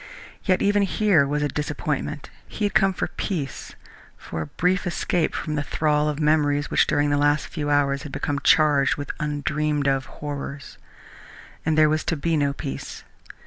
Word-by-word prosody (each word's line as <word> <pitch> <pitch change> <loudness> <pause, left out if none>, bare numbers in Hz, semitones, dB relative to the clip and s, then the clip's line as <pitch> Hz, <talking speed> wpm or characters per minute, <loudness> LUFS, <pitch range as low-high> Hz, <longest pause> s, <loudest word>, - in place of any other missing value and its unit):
Yet 185 -2 +2
even 205 0 +3
here 195 -6 +3
was 150 +1 -1
a - - +2
disappointment. 150 0 -3 0.2
He 210 - -3
had 205 - -1
come 195 -3 +4
for 185 - -3
peace, 150 - -4 0.4
for 80 - -6
a 80 - -4
brief 180 - 0
escape 175 -1 0
from 155 - -3
the 150 - 0
thrall 150 0 +1
of 150 0 -3
memories 150 -1 +2
which - - +3
during 145 0 +1
the 145 - +2
last 145 +1 +2
few 150 -3 -4
hours 140 -1 +2
had 145 - -8
become 140 +1 -2
charged 145 -3 +4
with 145 -1 -4
undreamed 150 0 -1
of 135 -1 +1
horrors 145 -1 -7 0.9
and 155 -1 +2
there 155 0 +6
was 155 +1 0
to 165 - -1
be 165 +3 0
no 145 -2 +2
peace. 65 - -6
150 Hz, 180 wpm, -24 LUFS, 145-155 Hz, 0.9 s, there